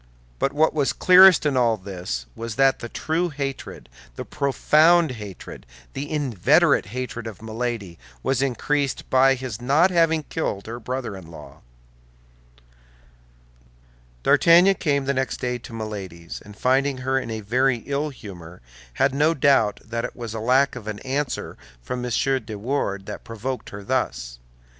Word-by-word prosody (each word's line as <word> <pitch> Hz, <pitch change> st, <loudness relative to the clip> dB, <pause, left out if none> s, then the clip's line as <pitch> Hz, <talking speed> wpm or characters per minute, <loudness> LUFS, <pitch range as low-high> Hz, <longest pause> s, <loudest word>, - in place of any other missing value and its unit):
But 135 Hz, -, +1 dB
what 155 Hz, +3 st, +2 dB
was 145 Hz, -3 st, +1 dB
clearest 185 Hz, -2 st, +7 dB
in 145 Hz, -2 st, +1 dB
all 120 Hz, -3 st, +2 dB
this 90 Hz, -, -5 dB
was 115 Hz, -1 st, -6 dB
that 135 Hz, +1 st, +3 dB
the 120 Hz, -, -7 dB
true 165 Hz, +7 st, -1 dB
hatred, 135 Hz, -, -6 dB, 0.3 s
the -, -, -6 dB
profound 155 Hz, +3 st, +3 dB
hatred, 105 Hz, -6 st, -9 dB, 0.3 s
the 145 Hz, +1 st, -5 dB
inveterate 145 Hz, -, +2 dB
hatred 120 Hz, 0 st, -5 dB
of 110 Hz, -4 st, -8 dB
Milady, 110 Hz, -5 st, -4 dB, 0.2 s
was 135 Hz, 0 st, 0 dB
increased 140 Hz, +1 st, -1 dB
by 135 Hz, +1 st, +5 dB
his 125 Hz, -3 st, -6 dB
not 150 Hz, +9 st, +3 dB
having 165 Hz, -2 st, +2 dB
killed 105 Hz, -11 st, -3 dB
her 115 Hz, +2 st, -6 dB
brother 125 Hz, -3 st, -4 dB
in 90 Hz, -4 st, -11 dB
law. 85 Hz, -, -13 dB, 2.6 s
D'Artagnan 175 Hz, +4 st, +6 dB
came 140 Hz, -6 st, -1 dB
the 140 Hz, -, +1 dB
next 130 Hz, 0 st, -2 dB
day 125 Hz, -1 st, -2 dB
to 120 Hz, -, -12 dB
Milady's, 100 Hz, -7 st, -7 dB
and 105 Hz, 0 st, -14 dB
finding 135 Hz, +1 st, +1 dB
her 135 Hz, 0 st, +2 dB
in 115 Hz, -, -7 dB
a 110 Hz, -1 st, -4 dB
very 125 Hz, +3 st, +1 dB
ill 145 Hz, +2 st, -1 dB
humor, 90 Hz, -, -11 dB, 0.3 s
had 135 Hz, -, +1 dB
no 150 Hz, +4 st, +2 dB
doubt 135 Hz, -8 st, +3 dB
that 115 Hz, +1 st, -4 dB
it -, -, -5 dB
was 115 Hz, -3 st, -6 dB
lack 125 Hz, +5 st, +2 dB
of 115 Hz, -4 st, -9 dB
an 105 Hz, -1 st, -4 dB
answer 135 Hz, +1 st, -3 dB, 0.2 s
from 125 Hz, -, -5 dB
M. 125 Hz, -, -3 dB, 0.3 s
de 110 Hz, -1 st, -7 dB
Wardes 100 Hz, -4 st, -2 dB
that 105 Hz, -, -7 dB
provoked 115 Hz, +2 st, -5 dB
her 100 Hz, 0 st, -9 dB
thus. -, -, -2 dB
125 Hz, 155 wpm, -23 LUFS, 110-140 Hz, 2.6 s, clearest